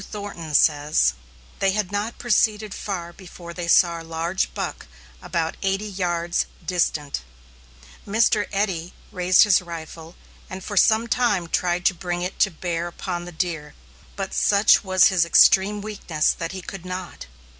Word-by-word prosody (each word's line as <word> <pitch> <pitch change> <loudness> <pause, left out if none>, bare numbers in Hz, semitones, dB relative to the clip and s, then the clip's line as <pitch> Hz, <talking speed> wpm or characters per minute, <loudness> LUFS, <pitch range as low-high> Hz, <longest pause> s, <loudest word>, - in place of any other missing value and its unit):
Q. - - -10
Thornton 195 -7 -6
says: 145 - +3 0.5
They 195 -1 +2
had 205 -2 -2
not 205 +3 -3
proceeded 215 -3 +1
far 175 -4 -5
before 175 -2 -11
they 175 -1 -5
saw 170 -1 +4
a - - -10
large 165 +3 -2
buck - - -5 0.3
about 165 -1 -2
eighty 195 +1 -1
yards 175 -4 -1 0.2
distant. 155 - -1 0.9
Mr. 215 0 +2
Eddy 190 -4 -2 0.2
raised 180 0 +4
his 205 -3 +4
rifle 165 -1 -9 0.3
and 185 0 -7
for 205 - -6
some 220 +3 +4
time 210 -7 +1
tried 175 +1 -1
to - - +4
bring 175 0 -4
it 180 +1 -5
to 195 - +4
bear 170 0 -3
upon 175 0 -5
the 175 - -8
deer, 160 -3 -4 0.4
but 195 -1 -5
such 200 0 +4
was 185 -1 +5
his 185 -3 +3
extreme 195 +4 +5
weakness 195 -7 -1
that - - -5
he 190 -1 -7
could 195 -1 -8
not. 185 -2 -7
180 Hz, 155 wpm, -23 LUFS, 170-200 Hz, 0.9 s, was